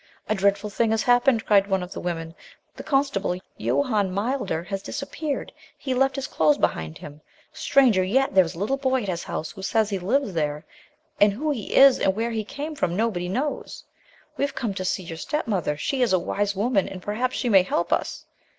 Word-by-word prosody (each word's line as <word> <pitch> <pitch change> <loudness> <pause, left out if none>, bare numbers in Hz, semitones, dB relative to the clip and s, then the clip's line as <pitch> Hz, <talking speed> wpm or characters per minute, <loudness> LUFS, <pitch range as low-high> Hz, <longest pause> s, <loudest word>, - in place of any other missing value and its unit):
"A - - +1
dreadful 200 +1 +1
thing 230 +2 +1
has 220 0 +1
happened," 245 -1 +3
cried 200 -1 +4
one 190 -2 0
of 180 - -9
the - - -6
women; 165 -2 -4 0.4
"the - - -7
constable, 270 - 0 0.2
Johann 140 - +1
Milder, 205 -4 -2
has 195 +1 -4
disappeared. 285 +4 -4 0.2
He 265 - -3
left 270 +1 +2
his 275 -1 -3
clothes 155 - +2
behind 80 0 -1
him. 150 +1 -11 0.3
Stranger 240 -9 +3
yet, 260 +8 +1
there 190 -1 +6
is 165 0 -6
a - - -11
little 215 +9 0
boy 260 -2 0
at 200 - -4
his 175 -2 -3
house 155 - -4
who 190 - -11
says 215 +2 +1
he 195 - -1
lives 220 +4 0
there, 150 -1 -2 0.5
and 205 0 +6
who 300 +8 -1
he 235 -8 -4
is 275 -1 +7
and 190 - +2
where 230 +2 -1
he 220 -1 -2
came 290 +8 -6
from 175 - -1
nobody 190 -5 -1
knows. 275 +9 -3 0.5
We - - 0
have 280 - -2
come 225 -5 -2
to 185 -1 -4
see 185 - -1
your 165 -1 -7
step 300 - -2
mother; 180 -9 -1
she 265 - -1
is 240 -6 +3
a - - +5
wise 200 +3 -1
woman 205 0 +1
and 190 - -7
perhaps 225 +7 -2
she 250 - -1
may 195 -4 +7
help 175 -1 -1
us. - - -2
205 Hz, 215 wpm, -24 LUFS, 180-255 Hz, 0.5 s, is